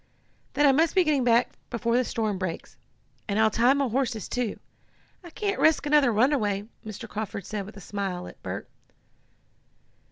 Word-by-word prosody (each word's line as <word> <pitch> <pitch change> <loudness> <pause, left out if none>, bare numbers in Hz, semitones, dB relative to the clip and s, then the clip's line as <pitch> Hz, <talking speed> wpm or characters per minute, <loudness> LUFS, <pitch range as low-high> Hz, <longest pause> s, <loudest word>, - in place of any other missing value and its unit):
"Then 295 - +3
I 280 - +7
must 320 +6 +2
be 370 - +5
getting 295 -5 +2
back 240 0 +3 0.2
before 235 -1 0
the 250 - +3
storm 215 -5 -2
breaks. 185 -3 -5 0.5
And 205 -1 -1
I'll 220 0 +4
tie 240 +5 +4
my 280 -1 +1
horses, 240 -3 -1
too. 245 -4 -2 0.6
I 345 - -10
can't 405 +4 -2
risk 315 -2 +4
another 290 -4 +4
runaway," 215 -4 +1 0.2
Mr. 220 +1 -7
Carford 210 -3 -5
said 205 -2 -4
with 215 - -12
a - - -10
smile 190 -2 -4
at - - -12
Bert. - - -5
230 Hz, 170 wpm, -26 LUFS, 210-275 Hz, 0.6 s, I